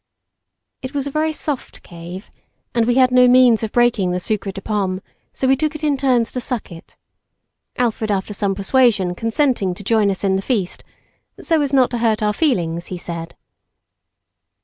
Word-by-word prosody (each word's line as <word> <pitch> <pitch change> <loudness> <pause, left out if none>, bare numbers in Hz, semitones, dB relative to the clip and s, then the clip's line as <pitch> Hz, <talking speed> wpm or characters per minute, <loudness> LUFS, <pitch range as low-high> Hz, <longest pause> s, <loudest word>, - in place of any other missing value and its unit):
It 260 +2 -7
was 280 -1 -1
a 280 - -4
very 310 +2 0
soft 295 -3 -5
cave, 175 +3 -10 0.4
and 235 -1 +1
we 245 - +2
had 255 -1 +4
no 250 0 +6
means 245 -2 +5
of 220 -2 -3
breaking 240 -6 +2
the 180 0 -1
sucre 200 +1 -2
de 195 - -7
pomme, 195 -3 -2 0.3
so 265 - -2
we 265 - +5
took 310 +3 -2
it 310 - -8
in 295 -2 +2
turns 255 -4 +1
to 250 - -4
suck 245 -6 -4
it; 165 -1 -13 0.8
Alfred 230 -3 -1
after 200 0 -1
some 200 -1 -1
persuasion, 200 -3 +2
consenting 225 -2 0
to 200 - -11
join 215 0 +2
us 195 0 -3
in 190 -1 +2
the - - -2
feast, 200 -5 -2 0.6
so 325 -3 +1
as 285 -2 -1
not 265 -3 +3
to 240 - -2
hurt 220 -2 +1
our 210 0 +1
feelings, 175 - 0
he 185 - -5
said. 170 -1 -7
225 Hz, 190 wpm, -19 LUFS, 195-260 Hz, 0.8 s, no